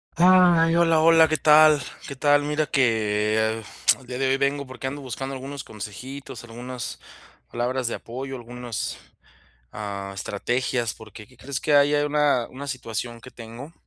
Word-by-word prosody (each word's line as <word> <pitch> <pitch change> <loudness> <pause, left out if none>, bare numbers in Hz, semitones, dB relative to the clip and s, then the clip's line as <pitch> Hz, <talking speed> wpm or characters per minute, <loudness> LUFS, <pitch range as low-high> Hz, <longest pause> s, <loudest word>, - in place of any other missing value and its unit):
Ay, 175 -2 +5
hola, 165 -2 +4
hola, 165 0 +6
¿qué 155 - +1
tal?, 155 -1 +6 0.3
¿qué 140 - -6
tal? 145 +2 +3
Mira 150 +1 0
que, 110 -5 +1
eh, 110 0 0 0.4
el 130 - -17
día 125 - -5
de 135 +1 0
hoy 135 - +3
vengo 140 0 -1
porque 130 0 -8
ando 145 +2 -5
buscando 135 +1 -5
algunos 135 +1 -7
consejitos, 120 +4 -8
algunas 120 +1 -7 0.5
palabras 125 +1 -2
de - - -3
apoyo, 130 +3 -7
algunas, 120 -1 -5 0.8
ah, 100 -2 -5
estrategias, 120 +4 -2
porque, 110 -1 -12
¿qué 125 - -22
crees?, 135 +1 -4
que 150 - +1
hay 145 +1 +5
a 145 0 +2
una 145 -5 +1
una 140 +2 -8
situación 120 -3 -5
que - - -11
tengo 120 +6 -10
130 Hz, 165 wpm, -24 LUFS, 115-145 Hz, 0.8 s, hola